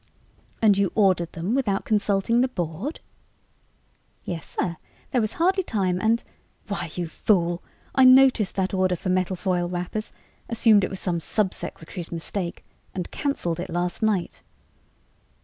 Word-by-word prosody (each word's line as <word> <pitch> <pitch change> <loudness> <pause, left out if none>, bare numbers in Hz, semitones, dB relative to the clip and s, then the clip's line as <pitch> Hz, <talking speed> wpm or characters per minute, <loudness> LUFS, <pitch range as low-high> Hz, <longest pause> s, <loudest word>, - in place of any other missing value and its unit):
"And 205 -3 +5
you 200 -2 +2
ordered 185 -5 +2
them 175 +7 -2
without 220 -8 0
consulting 210 +2 +2
the 260 - +3
Board?" 180 - -4 1.2
"Yes, 165 -4 -5
sir. 170 -2 -1 0.3
There 250 - +2
was 215 0 -1
hardly 375 +3 +2
time 185 - -1
and 225 +1 +2 0.2
" - - -39
"Why, 200 -4 -3
you 175 - -2
fool! 175 -1 +1 0.3
I 265 - +5
noticed 255 -5 +6
that 190 0 0
order 185 -1 +2
for 180 - -4
metal 185 0 +1
foil 180 -1 -1
wrappers, 180 +5 -4 0.4
assumed 225 -3 +4
it - - 0
was 190 - -5
some 175 -2 -1
sub 195 +3 0
secretary's 170 +1 -7
mistake, 170 +1 -4 0.3
and 180 -2 -4
canceled 175 - -2
it 180 - -4
last 175 +3 -2
night!" 210 -5 0
190 Hz, 150 wpm, -25 LUFS, 175-220 Hz, 1.2 s, noticed